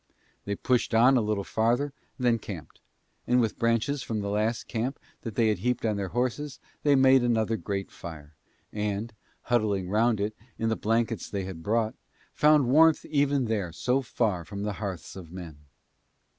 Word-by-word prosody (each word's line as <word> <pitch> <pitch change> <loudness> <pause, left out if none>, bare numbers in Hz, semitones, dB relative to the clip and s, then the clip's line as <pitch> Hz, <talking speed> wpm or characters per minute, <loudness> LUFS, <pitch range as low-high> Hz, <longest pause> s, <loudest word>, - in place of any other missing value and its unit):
They 100 - -2
pushed 120 +1 +1
on 125 +4 +6
a 125 - +4
little 105 -2 -1
farther 120 +8 +1 0.2
and 125 - -3
then 115 -1 +3
camped; 95 -7 -9 0.5
and 125 +1 +4
with 115 -3 0
branches 115 +5 +1
from 110 -4 -3
the 100 0 -3
last 110 +3 0
camp 125 +4 -2 0.2
that 115 -4 -6
they 115 -2 +3
had 105 - 0
heaped 125 -1 -1
on 110 -2 +1
their 100 -1 -2
horses 130 +6 -2 0.2
they 145 -1 +4
made 130 0 +6
another 115 -2 +1
great 100 -3 -4
fire 80 -3 -10 0.4
and, 105 +2 -2 0.3
huddling 105 -6 +1
round 110 +1 +3
it 105 +2 -2 0.2
in 115 - 0
the 110 - +1
blankets 115 -2 0
that 100 - -4
they 95 - -1
had 90 -4 -7
brought, 110 +4 0 0.4
found 150 -3 +4
warmth 160 +4 +5
even 140 -3 +1
there 105 -6 -1
so 125 +10 0
far 110 -8 -1
from 100 +3 -6
the 105 0 -2
hearths 95 -6 -5
of 90 -4 -10
men. 80 -5 -9
110 Hz, 185 wpm, -27 LUFS, 100-125 Hz, 0.5 s, on